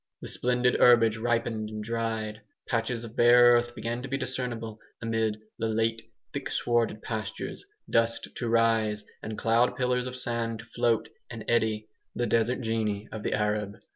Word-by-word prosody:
The - - -5
splendid 125 0 +1
herbage 115 -2 +6
ripened 115 -2 -1
and 110 0 -5
dried; 110 -1 -3 0.3
patches 115 0 -1
of 115 -1 -9
bare 120 0 +7
earth 120 0 +1
began 120 +1 -3
to 135 - -6
be 135 - 0
discernible 125 -4 -3 0.2
amid 110 -1 -1 0.2
the 115 - 0
late 115 +1 0 0.3
thick 140 -1 -4
swarded 115 -2 0
pastures, 110 -2 -5 0.2
dust 115 0 +1
to 120 - -2
rise 110 -2 +2 0.2
and 110 0 -5
cloud 115 +2 +3
pillars 125 0 0
of 125 - -5
sand 115 -2 -2
to 115 - -10
float 115 -1 +1 0.2
and 115 -3 -7
eddy 110 -2 +1 0.3
the 120 - 0
desert 115 +3 +1
genii 110 -2 -1
of 110 - -5
the - - -1
Arab. 105 -1 -1
115 Hz, 165 wpm, -28 LUFS, 110-120 Hz, 0.3 s, bare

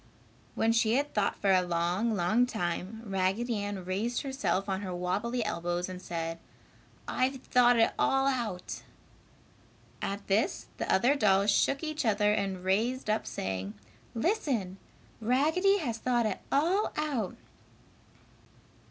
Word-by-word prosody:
When 225 - +2
she 230 0 +3
had 285 +2 0
thought 210 -2 +1
for 195 - +1
a 185 -1 +5
long, 180 +6 0
long 215 +7 +2
time, 195 +1 -3
Raggedy 200 +4 0
Ann 200 -2 -4
raised 210 +6 -1
herself 265 -8 -1
on 190 0 -1
her 190 -2 -4
wabbly 210 +7 -1
elbows 175 -3 -2
and 185 -1 -7
said, 165 -1 -4 0.7
"I've 260 +2 0
thought 245 -1 +4
it 225 - +3
all 270 0 +3
out." 235 -9 -2 1.2
At 200 +1 -3
this 215 - +1
the - - -2
other 245 +8 +4
dolls 200 -6 +3
shook 275 +8 +2
each 310 -1 -2
other 210 -2 +3
and 195 -3 -2
raised 220 +5 0
up 215 -10 -1
saying, 95 -3 -4 0.4
"Listen! 230 - 0 0.4
Raggedy 315 - +3
has 240 - -3
thought 240 -1 +1
it 215 - -1
all 345 +9 +2
out!" 280 -10 -1
215 Hz, 135 wpm, -30 LUFS, 185-250 Hz, 1.2 s, a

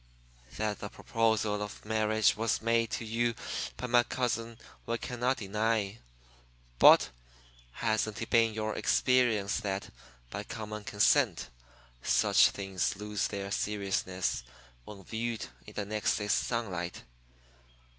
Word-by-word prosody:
That 105 -1 -1
the 100 - -5
proposal 110 -2 0
of 105 0 -7
marriage 110 0 +2
was 115 0 0
made 115 0 +1
to 115 - -3
you 115 +1 0 0.4
by - - -4
my 120 0 +5
cousin 115 -2 -2 0.3
we 115 - 0
cannot 125 +2 -1
deny. 105 0 -1 0.8
But - - +8 0.6
hasn't 110 -1 -1
it 115 - -5
been 115 -2 +4
your 110 -1 -2
experience 115 -6 +2
that, 100 -2 -4 0.4
by - - -4
common 105 -1 -6
consent, 105 0 +2 0.5
such - - +5
things 95 -2 -2
lose 105 0 -2
their 100 0 -5
seriousness 95 - -1 0.4
when 100 -2 -10
viewed 115 +1 -3 0.2
in - - -11
the 105 - -2
next 105 0 0
day's 105 0 -1
sunlight? 95 -8 -2
110 Hz, 125 wpm, -31 LUFS, 100-115 Hz, 0.8 s, But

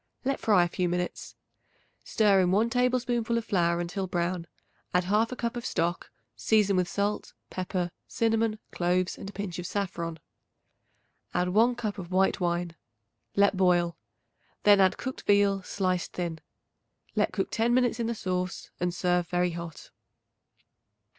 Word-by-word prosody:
Let 275 0 0
fry 205 -5 +4
a - - +1
few 180 0 -1
minutes. 180 0 -3 0.7
Stir 205 -3 +3
in 180 - +2
1 215 +5 +2
tablespoonful 245 -2 +1
of 230 - -2
flour 170 -4 +1
until 180 +3 -3
brown; 175 -1 -2 0.5
add 180 - +4
1/2 220 +6 +1
cup 235 0 -2
of 240 - -4
stock; 170 -3 -1 0.3
season 210 -3 +3
with 180 -1 +2
salt, 205 +2 -2 0.2
pepper, 180 -1 -2 0.2
cinnamon, 225 -1 +1
cloves 180 +1 0
and 195 - -8
a - - -8
pinch 200 -4 -5
of 175 - -4
saffron. 170 -5 -3 1.2
Add 180 0 +1
1 230 +6 +4
cup 215 -4 -3
of 175 -2 -7
white 190 +1 +2
wine; 175 -1 -1 0.6
let 200 0 +4
boil; 175 -2 +3 0.7
then 205 -1 +7
add 190 -1 +4
cooked 260 0 -5
veal 200 -1 +4
sliced 185 -2 -2
thin. 170 -3 -3 0.8
Let - - +2
cook - - -2
ten 230 +1 +1
minutes 245 -1 +2
in 230 - 0
the 235 - -1
sauce 185 -2 -3
and 180 0 -1
serve 180 -1 +1
very 180 0 +1
hot. 170 -2 -8
190 Hz, 155 wpm, -28 LUFS, 175-220 Hz, 1.2 s, then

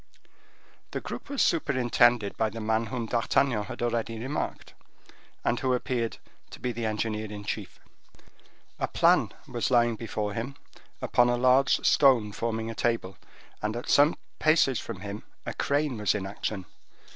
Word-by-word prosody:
This - - -5
group - - -7
was 280 -2 +1
superintended 120 -7 +3
by 110 - +1
the 115 +2 -7
man 110 +1 0
whom 120 -2 -3
D'Artagnan 120 -1 +1
had - - -6
already 115 -1 -1
remarked, 130 +6 -4 0.7
and 120 - +1
who 130 -1 +1
appeared 120 -2 -2 0.3
to - - -11
be 125 - -2
the 115 -1 -2
engineer 110 0 -2
in 105 -1 -7
chief. - - -5 1.0
A - - 0
plan - - +3 0.2
was 120 -2 -1
lying 120 -2 +4
open 115 - -5
before 105 -2 -2
him 120 +5 -4 0.5
upon 120 0 +4
a 120 - +2
large 130 +2 +4
stone 125 -7 +5
forming 115 +1 -2
a - - -5
table, 115 -5 -1 0.5
and 105 +1 -2
at 120 - -5
some 145 +3 +5 0.2
paces 155 -6 +4
from 90 - -7
him 100 +1 -6 0.2
a - - -3
crane 140 -4 0
was 105 -1 +2
in 100 -2 -2
action. 100 -1 -4
115 Hz, 160 wpm, -28 LUFS, 110-125 Hz, 1.0 s, stone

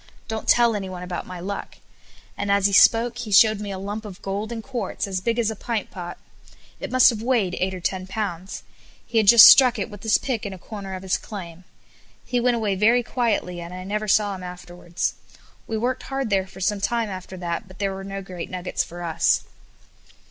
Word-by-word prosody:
Don't 220 -2 -5
tell 235 -2 +4
anyone 185 -3 -5
about 180 -1 -5
my 180 -1 -7
luck," 200 +3 -6 0.6
and 200 - -2
as 200 -1 +3
he 200 - +3
spoke 235 +4 +5
he 230 -3 -5
showed 215 +1 +6
me 210 -1 -5
a 195 - -4
lump 205 +3 -5
of 200 -4 -9
gold 200 +3 -3
and 225 -1 -5
quartz 240 -6 -3
as 190 -2 -3
big 235 +3 0
us 225 -2 +1
a - - -6
pint 225 0 -4
pot. 175 -1 -7 0.6
It - - -5
must 255 0 +6
have 220 -2 -5
weighed 225 -7 +1
eight 190 +1 -1
or - - -6
ten 185 +1 -3
pounds. 190 -3 -5 0.4
He 230 - +1
had 215 - +1
just 235 +2 +11
struck 250 -3 +8
it 210 +2 -4
with 205 -1 -10
his 220 -1 +3
pick 250 -5 -3
in 200 - -5
a - - -8
corner 195 0 -7
of 185 - -8
his 185 -1 0
claim. 180 -4 -9 0.6
He 245 - 0
went 245 0 +2
away 215 -4 0
very 225 +5 +3
quietly, 220 -8 -1
and 170 +1 -8
I 185 - -7
never 210 +3 -3
saw 205 0 +3
him 190 - -8
afterwards. 180 -1 -4 0.5
We 225 - -2
worked 245 +3 -1
hard 270 -4 -4
there 190 -1 +1
for 190 0 -13
some 200 +1 0
time 230 +1 0
after 185 0 -8
that, 170 0 -4
but 185 0 -15
there 195 -1 -1
were 190 0 -7
no 195 0 -6
great 180 -3 -7
nuggets 180 0 -2
for 175 +1 -9
us. 165 -1 +1
200 Hz, 220 wpm, -23 LUFS, 185-225 Hz, 0.6 s, just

